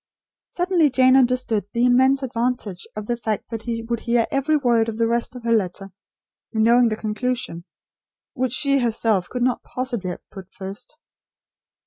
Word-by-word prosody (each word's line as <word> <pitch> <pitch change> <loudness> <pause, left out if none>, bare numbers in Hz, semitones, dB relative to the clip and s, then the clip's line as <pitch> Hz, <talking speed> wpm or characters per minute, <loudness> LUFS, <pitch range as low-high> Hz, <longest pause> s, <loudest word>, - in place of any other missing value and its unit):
Suddenly 355 -3 +2
Jane 255 0 +4
understood 250 -5 +2
the 235 +1 +2
immense 260 +2 +4
advantage 235 -6 -2
of 215 0 -5
the 240 - -1
fact 220 -2 -4
that 225 -1 -4
he 230 0 -4
would 235 0 -2
hear 235 -1 +1
every 280 +3 +2
word 235 -5 +2
of 220 - -5
the 230 - +2
rest 235 +2 -1
of 245 - -9
her 230 - -1
letter, 195 -2 -1 0.6
knowing 235 +2 +4
the 215 - -1
conclusion, 220 -4 -3 0.7
which 255 -3 -1
she 275 +1 +2
herself 225 -5 +1
could 250 -1 -2
not 250 0 +1
possibly 245 -7 -3
have 180 - -8
put 190 -2 -11
first. 195 +9 -9
235 Hz, 165 wpm, -22 LUFS, 220-255 Hz, 0.7 s, Jane